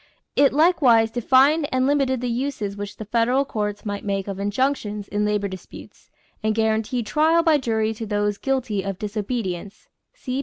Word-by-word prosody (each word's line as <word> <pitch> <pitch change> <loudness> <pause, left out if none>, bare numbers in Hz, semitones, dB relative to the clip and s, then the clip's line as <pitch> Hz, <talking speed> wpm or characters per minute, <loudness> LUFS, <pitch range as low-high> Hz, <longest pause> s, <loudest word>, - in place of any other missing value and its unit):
It 280 -1 +5
likewise 270 -8 +4
defined 270 +6 +3
and 255 0 +1
limited 270 -3 +1
the 250 - -2
uses 240 -4 -3
which 205 0 -7
the 215 - -7
federal 240 +5 +1
courts 210 -4 -4
might 205 -1 -4
make 195 -1 -2
of 195 -1 -5
injunctions 210 -1 -1
in 210 0 -1
labor 210 -1 0
disputes 190 -1 -12 0.3
and 215 -1 0
guaranteed 220 +2 0
trial 320 +6 +3
by 320 -3 +4
jury 220 -3 0
to 220 0 -6
those 205 0 -1
guilty 255 -7 -1
of 195 -1 -4
disobedience 205 -3 -4 0.3
(see 260 - -4
p. - - 0
225 Hz, 175 wpm, -23 LUFS, 205-265 Hz, 0.3 s, It